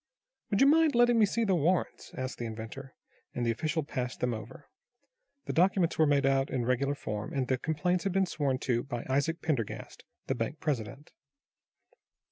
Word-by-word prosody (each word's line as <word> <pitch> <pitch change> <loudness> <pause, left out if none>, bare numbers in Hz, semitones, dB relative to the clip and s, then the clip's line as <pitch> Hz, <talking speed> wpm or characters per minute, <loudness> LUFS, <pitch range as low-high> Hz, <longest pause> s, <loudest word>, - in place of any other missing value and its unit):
"Would 200 - +1
you - - +8
mind 310 0 +5
letting 240 -1 +5
me 210 - +5
see 230 +3 0
the 195 -4 +2
warrants?" 175 +2 0
asked 130 0 -4
the 120 - -3
inventor, 115 +4 -8 0.4
and 120 - -1
the 115 - +2
official 155 +6 -1
passed 125 -3 -4
them 125 -1 0
over. 110 0 -9 0.8
The - - -3
documents 180 -1 +2
were 155 - +5
made 145 -1 +3
out 135 0 +2
in 125 -3 -1
regular 135 +3 +1
form, 105 -6 -5
and 130 -2 -1
the 130 -1 0
complaints 175 +4 0
had 195 - +1
been 195 0 +3
sworn 140 -6 -1
to 120 -2 +1
by 120 -2 -5
Isaac 140 +5 0
Pendergast, 135 -10 -3 0.2
the - - 0
bank 155 - -3
president. 140 0 -3
140 Hz, 185 wpm, -30 LUFS, 125-180 Hz, 0.8 s, you